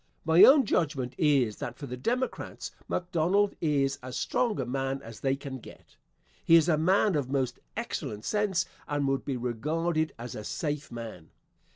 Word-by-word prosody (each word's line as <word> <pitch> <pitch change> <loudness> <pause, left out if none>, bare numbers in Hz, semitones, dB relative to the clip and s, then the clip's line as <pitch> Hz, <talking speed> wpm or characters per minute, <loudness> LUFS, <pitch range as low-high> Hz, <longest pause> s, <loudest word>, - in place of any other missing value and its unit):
My 160 +2 +7
own 275 -1 +8
judgment 140 -9 0
is 135 -9 +3
that 120 - -6
for 145 - -7
the 125 -2 -5
Democrats, 245 - -3 0.2
McDonald 180 +3 +1
is 140 -3 +1
as 130 0 -6
strong 230 - 0
a 130 - -1
man 135 +2 -2
as 115 -1 -10
they 135 -1 +1
can 135 -1 -7
get. - - -15 0.5
He 165 - +6
is 165 0 +6
a 165 - +4
man 185 +6 +3
of 140 -5 -1
most 130 -3 -1 0.2
excellent 105 +1 -4
sense 205 -4 +1 0.2
and 145 -1 0
would 135 0 0
be 135 -3 -2
regarded 155 +7 -1
as 120 0 -7
a 105 - -6
safe 150 +4 -3
man. 115 -9 -8
140 Hz, 175 wpm, -29 LUFS, 125-170 Hz, 0.5 s, own